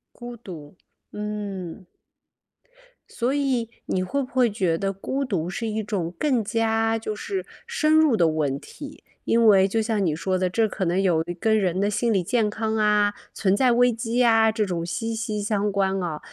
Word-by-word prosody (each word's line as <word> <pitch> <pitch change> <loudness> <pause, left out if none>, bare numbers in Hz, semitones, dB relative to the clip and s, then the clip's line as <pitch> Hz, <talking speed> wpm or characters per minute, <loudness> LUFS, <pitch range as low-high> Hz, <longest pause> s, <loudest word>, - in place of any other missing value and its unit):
孤 240 0 -8
独， 165 -8 -11 0.4
嗯。 205 -4 -5 1.2
所 245 +3 -1
以 265 -5 0 0.2
你 185 - 0
会 280 +9 -1
不 255 - -4
会 250 -2 +3
觉 185 -6 0
得 195 +1 -2
孤 265 +8 -3
独 180 -8 -2
是 230 +4 -4
一 220 0 -2
种 185 -5 -3
更 255 - +1
加 225 0 +1
就 215 -1 -4
是 380 - -4 0.2
深 315 -10 +1
入 315 -6 +5
的 170 -5 +3
问 145 -3 -1
题？ 285 - -11 0.2
因 230 0 +2
为 195 -3 +6
就 220 +3 0
像 215 -2 0
你 155 -4 0
说 185 +3 -1
的， 185 0 0
这 220 +4 +1
可 200 -2 -4
能 175 +2 +1
有 170 -4 +2 0.2
跟 220 +2 +2
人 185 -3 0
的 200 +1 +1
心 230 +3 0
理 190 -4 +1
健 215 +3 +1
康 220 +1 -2
啊， 210 -1 +3 0.2
存 195 -1 +1
在 250 +2 +3
危 245 0 +4
机 230 +1 -3
呀， 225 -3 +5
这 215 -1 0
种 175 -3 -3
息 225 +6 -3
息 220 -2 -3
相 205 -1 0
关 195 -1 0
啊。 165 -4 -3
210 Hz, 205 characters per minute, -24 LUFS, 190-230 Hz, 1.2 s, 为